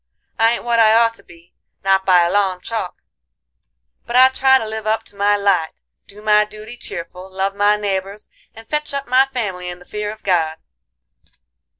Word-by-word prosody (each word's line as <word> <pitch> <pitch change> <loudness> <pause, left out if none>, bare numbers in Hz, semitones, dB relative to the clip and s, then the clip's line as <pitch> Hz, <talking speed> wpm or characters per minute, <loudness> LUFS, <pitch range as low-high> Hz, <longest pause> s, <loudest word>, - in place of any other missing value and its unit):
I 225 +1 +4
ain't - - -4
what 235 -1 +1
I 220 -1 +5
ought 230 0 +4
to - - -12
be, 170 0 -19 0.3
not 195 0 +2
by 180 -2 +5
a 170 - 0
long 195 -3 +1
chalk, 215 -2 -5 1.0
but 240 - -4
I 260 +1 +7
try 265 0 +4
to 225 - -4
live 220 0 -5
up 220 +1 0
to 205 - -17
my 205 +1 +2
light, 180 - 0 0.2
do 210 +1 -15
my 210 0 +4
duty 215 +2 -10
cheerful, 180 -2 -8
love 195 +1 -2
my 205 +1 +3
neighbors, 200 0 -4 0.3
and 225 0 -13
fetch 300 -1 -3
up 275 0 -3
my 260 +2 +4
family 200 -9 -4
in 175 - -7
the 180 - -17
fear 210 +1 -4
of 215 - -13
God. 165 -4 0
210 Hz, 195 wpm, -19 LUFS, 190-230 Hz, 1.0 s, I